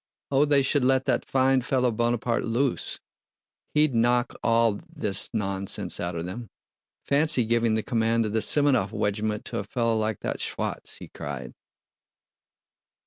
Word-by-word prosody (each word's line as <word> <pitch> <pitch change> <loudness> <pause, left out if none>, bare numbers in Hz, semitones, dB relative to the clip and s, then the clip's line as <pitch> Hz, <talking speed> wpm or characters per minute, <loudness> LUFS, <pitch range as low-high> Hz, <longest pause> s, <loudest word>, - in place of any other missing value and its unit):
Oh, 140 +2 +4
they 145 -2 +3
should 140 0 +2
let 130 0 +3
that 125 -3 +1
fine 130 0 +3
fellow 125 0 +1
Bonaparte 120 +1 0
loose—he'd 140 +3 -2
knock 120 +1 +2
all 115 -2 +2
this 105 - -1
nonsense 100 -3 -2
out 85 0 -3
of 85 0 -3
them! 100 +4 -6 0.5
Fancy 145 -3 +2
giving 115 -1 +2
the 110 - -1
command 115 0 +1
of 105 - -3
the 110 - +2
Semënov 130 -2 +3
wegiment 105 0 -1
to - - -3
a - - -3
fellow 115 +2 0
like 110 -2 -1
that - - -3
Schwa'tz!" - - -4
he - - -10
cried. - - -7
115 Hz, 145 wpm, -26 LUFS, 110-130 Hz, 0.5 s, Oh